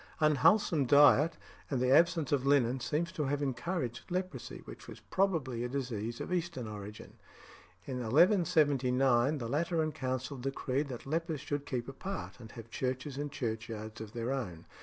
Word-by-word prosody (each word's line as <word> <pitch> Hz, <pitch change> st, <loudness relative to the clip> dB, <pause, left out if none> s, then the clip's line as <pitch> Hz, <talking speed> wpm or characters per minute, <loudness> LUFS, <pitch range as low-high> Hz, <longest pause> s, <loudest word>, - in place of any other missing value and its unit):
Unwholesome 155 Hz, -, +4 dB
diet 145 Hz, +3 st, +6 dB, 0.3 s
and 135 Hz, -, 0 dB
the 125 Hz, +1 st, +2 dB
absence 165 Hz, +1 st, +4 dB
of 140 Hz, -3 st, +2 dB
linen 135 Hz, -2 st, +3 dB
seem 150 Hz, +6 st, 0 dB
to 165 Hz, -3 st, -3 dB
have 140 Hz, +1 st, 0 dB
encouraged 130 Hz, 0 st, -3 dB
leprosy, 185 Hz, +1 st, -4 dB
which -, -, -11 dB
was -, -, -10 dB
probably 155 Hz, -12 st, 0 dB
a 125 Hz, -, -2 dB
disease 120 Hz, -4 st, -3 dB
of -, -, -4 dB
Eastern 165 Hz, -9 st, -2 dB
origin. 105 Hz, 0 st, -9 dB, 0.7 s
In 130 Hz, -2 st, -4 dB
1179 135 Hz, -, +3 dB
the 120 Hz, -4 st, -4 dB
Lateran 160 Hz, +3 st, 0 dB
Council 130 Hz, 0 st, -3 dB
decreed 135 Hz, +2 st, -2 dB
that 125 Hz, -3 st, -7 dB
lepers 160 Hz, 0 st, -2 dB
should 145 Hz, 0 st, -3 dB
keep 125 Hz, -2 st, -3 dB
apart, 160 Hz, +4 st, -6 dB
and 110 Hz, -3 st, -11 dB
have 115 Hz, -1 st, -10 dB
churches 130 Hz, +3 st, -3 dB
and 145 Hz, 0 st, -3 dB
churchyards 110 Hz, -3 st, -5 dB
of 110 Hz, 0 st, -8 dB
their 120 Hz, +1 st, -2 dB
own. 95 Hz, -12 st, -4 dB
135 Hz, 160 wpm, -32 LUFS, 120-155 Hz, 0.7 s, diet